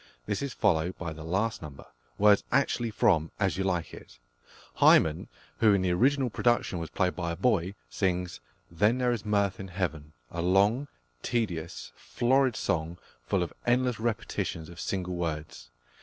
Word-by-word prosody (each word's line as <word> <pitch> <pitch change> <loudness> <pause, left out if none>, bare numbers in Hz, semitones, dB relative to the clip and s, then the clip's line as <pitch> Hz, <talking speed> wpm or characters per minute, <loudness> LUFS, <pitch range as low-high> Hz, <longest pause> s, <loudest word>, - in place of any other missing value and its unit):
This 100 - -2
is 140 -1 -3
followed 90 -5 +1
by 85 -3 -5
the 80 0 -9
last 100 +7 -1
number, 75 -3 -10 0.3
words 105 0 +5
actually 125 -4 +1
from 80 -6 +2
As 95 -2 +1
You 95 - -1
Like 90 -4 -1
It. - - -12 0.6
Hymen, 80 +3 +5 0.3
who 110 -3 +5
in 95 - 0
the 90 - +1
original 130 +6 +2
production 120 -4 +1
was 80 -2 -5
played 90 0 0
by 85 -1 -2
a - - -4
boy, 95 -1 +1
sings 90 +5 -2 0.3
"Then 105 +9 +2
is 120 -3 +1
there 105 - -8
mirth 100 -2 +1
in 95 - -6
heaven," 80 -5 -4 0.2
a 85 - -3
long, 100 +10 +3 0.3
tedious, 85 - -3
florid 130 0 +1
song, 80 +1 -2 0.3
full 95 +4 +1
of 85 - -6
endless 125 -1 +2
repetitions 110 -7 -3
of 85 -1 -11
single 90 -2 -3
words. 80 -7 -4
95 Hz, 165 wpm, -28 LUFS, 85-110 Hz, 0.6 s, words